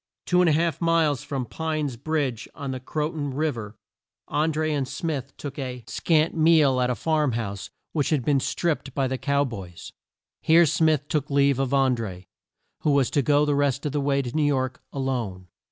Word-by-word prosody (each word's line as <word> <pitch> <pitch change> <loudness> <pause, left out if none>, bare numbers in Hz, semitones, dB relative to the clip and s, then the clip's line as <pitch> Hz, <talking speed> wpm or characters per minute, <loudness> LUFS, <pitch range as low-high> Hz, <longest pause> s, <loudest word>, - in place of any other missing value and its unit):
Two 180 0 +3
and 180 - +4
a - - +4
half 165 +2 0
miles 165 -5 +2
from 135 -3 -3
Pine's 155 -1 -3
Bridge, 135 -3 -2
on 140 -2 -5
the 130 - -4
Cro 150 +4 -2
ton 145 -4 -4
Riv 155 -1 0
er, 105 -2 -8 0.5
An 155 +2 +1
dré 155 0 -1
and 140 -3 -1
Smith 140 -3 -4
took 145 0 -7
a 125 -3 -5
scant 160 -1 +1
meal 155 -5 +4
at 125 - +1
a 125 - 0
farm 155 -2 +1
house 100 -4 -4 0.2
which 145 -4 0
had 145 -7 0
been 140 -2 +3
stripped 145 -2 -2
by 135 -2 +1
the 130 0 -3
Cow 140 0 +1
Boys. 95 -9 -8 0.5
Here 170 +2 +6
Smith 155 -1 +2
took 150 -2 -1
leave 140 -1 +3
of 135 -1 0
An 135 -2 +3
dré, 95 -6 -6 0.5
who - - 0
was 135 -4 +2
to 145 - +2
go 145 +2 +3
the 145 - +1
rest 140 0 0
of 145 - -1
the 145 0 -1
way 140 0 +1
to 120 +1 -6
New 155 - +2
York 130 -3 0
a - - -9
lone. 115 -9 -3
140 Hz, 210 wpm, -25 LUFS, 130-155 Hz, 0.5 s, Here